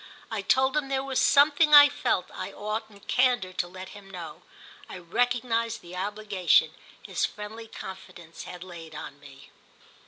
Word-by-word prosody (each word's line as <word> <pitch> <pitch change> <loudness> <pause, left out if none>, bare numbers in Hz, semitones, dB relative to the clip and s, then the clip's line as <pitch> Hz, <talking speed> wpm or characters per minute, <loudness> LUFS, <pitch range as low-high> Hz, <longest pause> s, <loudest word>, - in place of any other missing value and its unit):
I 220 -2 -2
told 265 +7 +2
him 300 -2 0
there 270 -1 0
was 270 -1 0
something 295 +2 +5
I 290 0 +11
felt 285 - -1
I - - -6
ought 215 +2 -4
in 200 -1 -17
candour 245 -8 +1
to 175 - -2
let 185 +1 -10
him 200 -1 -13
know—I 170 0 -11
recognised 230 +5 -1
the 175 +1 -11
obligation 200 -1 +1 0.3
his - - -3
friendly 220 +2 -5
confidence 185 -5 -10
had 180 0 -9
laid 165 -3 -10
on 145 - -8
me. 140 -1 -15
205 Hz, 155 wpm, -27 LUFS, 180-245 Hz, 0.3 s, I